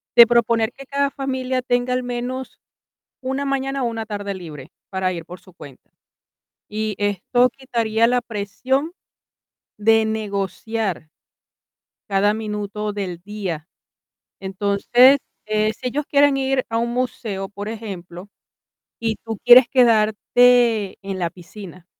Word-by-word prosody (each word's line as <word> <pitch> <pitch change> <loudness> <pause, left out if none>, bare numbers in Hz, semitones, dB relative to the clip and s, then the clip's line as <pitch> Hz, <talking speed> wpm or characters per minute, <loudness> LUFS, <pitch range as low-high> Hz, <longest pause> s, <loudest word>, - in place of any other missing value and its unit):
De 235 -1 +10
proponer 235 -1 +2
que 275 0 -12
cada 280 +1 0
familia 260 -2 -2
tenga, 245 0 0
al 255 0 -1
menos, 245 +2 -5 0.6
una 265 +2 -2
mañana 275 0 -1
o - - +1
una 225 -1 -4
tarde 205 -2 -4
libre 155 -7 -10 0.2
para 190 -1 -1
ir 170 -2 -7
por 180 +1 -10
su 180 0 -19
cuenta, 140 -6 -14 0.8
y 215 0 -3
esto 205 +5 +2
quitaría 230 -3 0
la 245 +1 +2
presión 240 - -2 0.8
de 225 +1 +3
negociar 210 -3 -3 1.0
cada 200 +2 +3
minuto 210 -1 -4
del 185 -4 -5
día. 190 -5 -5 0.7
Entonces, 200 +7 +4 0.3
eh, 215 0 +1
si 250 +3 -6
ellos 285 +4 -2
quieren 285 -1 +4
ir 265 -1 0
a 225 - -2
un 235 +1 0
museo, 230 -6 -3
por 205 +1 -7
ejemplo, 190 -4 -8 0.7
y 225 -1 -1
tú 225 -1 -4
quieres 245 0 +9
quedarte 230 -2 +3
en 195 -1 -5
la 170 -2 -1
piscina, 185 0 -12
220 Hz, 130 wpm, -21 LUFS, 200-250 Hz, 1.0 s, De